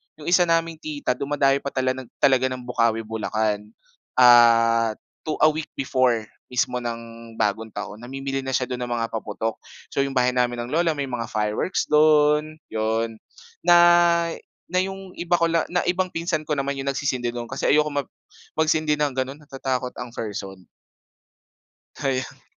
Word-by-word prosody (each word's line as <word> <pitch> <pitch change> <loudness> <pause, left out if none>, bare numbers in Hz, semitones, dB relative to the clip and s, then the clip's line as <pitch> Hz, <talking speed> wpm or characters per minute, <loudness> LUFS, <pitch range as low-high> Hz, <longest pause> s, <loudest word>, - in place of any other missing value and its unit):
'yong 155 +2 -6
isa 175 -1 +5
naming 165 -1 0
tita 150 -4 -3
dumadayo 140 0 +2
pa - - -7
tala 130 -1 +1
ng 130 -1 -7 0.2
talaga 130 -1 +5
ng 130 -1 -5
Bocaue, 115 -2 +1
Bulacan. 110 -1 -2 0.5
Ah 115 -2 +6 0.3
to 155 - 0
a 155 - +8
week 155 0 -5
before 130 -4 +1 0.2
mismo 125 0 0
ng 115 -1 -7
Bagong 110 +2 0
Taon 105 +1 -6
namimili 135 +2 -4
na 135 - -5
siya 130 - +1
do'n 125 -1 -3
ng - - -9
mga 115 -1 -2
paputok. 110 0 -3 0.3
So, - - -2
'yong 135 0 -5
bahay 125 0 +3
namin 125 -1 0
ng 120 - -8
lola, 165 +1 +2
may 140 -2 -3
mga 120 -2 -3
fireworks 105 - -1
do'n, 150 0 +4 0.2
'yon. 110 +1 -1 0.5
Na 175 - +7 0.9
na 180 +1 +1
'yong 190 0 -5
iba 175 0 +1
ko 170 -1 +2
la 165 -1 +1
na 180 0 0
ibang 185 +1 +1
pinsan 165 -2 -2
ko 150 - 0
naman 140 0 -2
'yong 135 0 -5
nagsisindi 130 -3 -1
no'n 120 -1 -5
kasi 130 - -1
ayoko 150 +1 +4
mag 145 -1 -2 0.5
magsindi 155 -1 +2
ng 150 -1 0
gano'n. 135 +3 -3
Natatakot 135 -3 -3
ang 125 -1 -7
person. 95 -4 -6 1.3
Kaya 135 -2 -1
ang. - - -18
130 Hz, 170 wpm, -23 LUFS, 115-150 Hz, 1.3 s, a